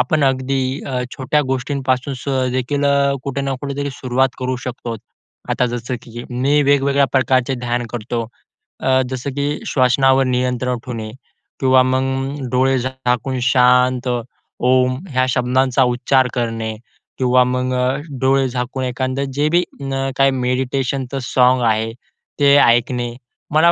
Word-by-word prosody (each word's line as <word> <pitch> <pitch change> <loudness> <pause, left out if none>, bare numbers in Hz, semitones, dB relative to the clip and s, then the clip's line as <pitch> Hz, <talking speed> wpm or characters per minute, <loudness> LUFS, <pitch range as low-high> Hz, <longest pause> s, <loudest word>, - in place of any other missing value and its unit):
आपण 140 +3 +2
अगदी 135 0 0 0.3
अ, 125 -2 -2
छोट्या 140 +3 +1
गोष्टींपासून 135 0 -1
स 130 -2 0
देखील 140 +3 -1
अ, 140 0 +3
कुठे 140 0 -3
ना 135 -1 -1
कुठे 140 -1 -5
तरी 140 0 -2
सुरुवात 130 +1 +2
करू 130 0 -2
शकतो. 120 -2 -5 0.5
आता 125 - +1
जसं 120 +1 -4
की 120 0 -9
मी 135 +4 +2
वेगवेगळ्या 140 0 +3
प्रकारचे 130 0 +2
ध्यान 120 0 -1
करतो. 115 0 -3 0.6
अ, 130 0 +3
जसं 130 +2 -4
की 145 0 0 0.2
श्वासनावर 135 +1 +3
नियंत्रण 125 0 0
ठेवणे 110 -3 -5 0.5
किंवा 130 -1 +5
मग 135 +2 -1
डोळे 130 +1 +2
झाकून 130 0 -2
शांत 125 0 +3 0.6
ओम 130 0 +3
ह्या 130 -1 +1
शब्दांचा 130 +1 +2
उच्चार 125 +1 +2
करणे 115 -2 -2 0.4
किंवा 125 0 +4
मग 125 0 -1
अ, 125 +1 +1 0.3
डोळे 135 0 +3
झाकून 125 +1 -3
एखादं 130 +2 -2
जे 145 +2 +1
बी 175 - +4 0.5
काय 135 0 +4
मेडिटेशनचं 130 +1 -1
साँग 125 0 +3
आहे 110 +1 +1 0.5
ते 140 0 +6
ऐकणे. 120 -1 +2 0.4
मला 170 +3 +5
130 Hz, 135 wpm, -19 LUFS, 125-135 Hz, 0.6 s, ते